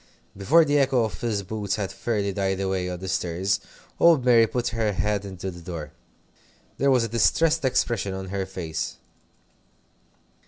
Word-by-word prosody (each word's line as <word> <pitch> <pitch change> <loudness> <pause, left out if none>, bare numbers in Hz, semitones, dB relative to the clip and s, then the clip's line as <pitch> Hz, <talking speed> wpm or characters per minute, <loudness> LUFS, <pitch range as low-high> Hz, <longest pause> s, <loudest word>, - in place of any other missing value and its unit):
Before 150 +12 +4
the 145 0 +2
echo 130 -3 +3
of 110 -4 -2
Phil's 105 +2 -2
boots 100 0 -3
had 100 -2 -3
fairly 100 0 -2
died 95 -1 -1
away 95 -2 -1
on 90 - -4
the 95 +2 -7
stairs, 90 +2 0 0.4
old 160 -7 +5
Mary 115 -2 +6
put 120 +1 -1
her 110 -2 -1
head 100 +2 -1
into 95 -1 -6
the 85 -1 -11
door. 80 -3 -7 0.9
There 140 - +3
was 130 -3 +4
a - - -1
distressed 145 - +2
expression 120 -6 0
on 95 0 -6
her 95 0 -3
face. 85 -5 -4
100 Hz, 165 wpm, -25 LUFS, 95-120 Hz, 0.9 s, Mary